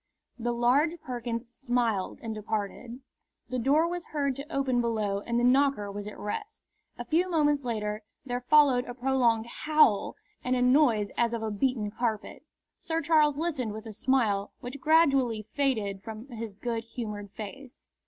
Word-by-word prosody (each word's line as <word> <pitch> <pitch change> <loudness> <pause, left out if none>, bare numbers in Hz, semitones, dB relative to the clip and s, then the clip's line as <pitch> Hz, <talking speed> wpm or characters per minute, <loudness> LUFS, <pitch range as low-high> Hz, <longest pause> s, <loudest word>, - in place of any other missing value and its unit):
The 240 +1 -1
large 270 +8 +2
Perkins 240 -3 -4
smiled 240 -6 -1
and 225 -1 -3
departed. 220 +3 -4 0.5
The 255 - -2
door 290 +7 +3
was 350 0 -4
heard 280 -3 -1
to 280 +4 -8
open 265 -4 +1
below 215 -4 0
and 235 0 +1
the - - 0
knocker 255 -5 +3
was 205 +1 -6
at 210 - -8
rest. 420 - -5 0.3
A - - -6
few 345 +3 +1
moments 295 -4 +2
later 215 -3 -2 0.2
there 245 -1 -3
followed 265 -2 +5
a 245 - -7
prolonged 245 -3 +2
howl 300 -4 +2 0.3
and 250 0 +1
a 250 - +1
noise 250 -6 +4
as 235 0 +2
of 230 -1 -2
a 220 - -2
beaten 210 -1 0
carpet. 220 -2 -3 0.4
Sir 325 0 -2
Charles 300 -2 +3
listened 290 -9 -2
with 220 +1 -8
a 220 - -7
smile 215 -4 +1
which 255 +3 -8
gradually 275 -8 +3
faded 220 -9 0
from 220 +2 -8
his 225 -4 -6
good 230 +1 -3
humoured 210 -3 -6
face. 245 +5 -9
245 Hz, 165 wpm, -28 LUFS, 220-275 Hz, 0.5 s, followed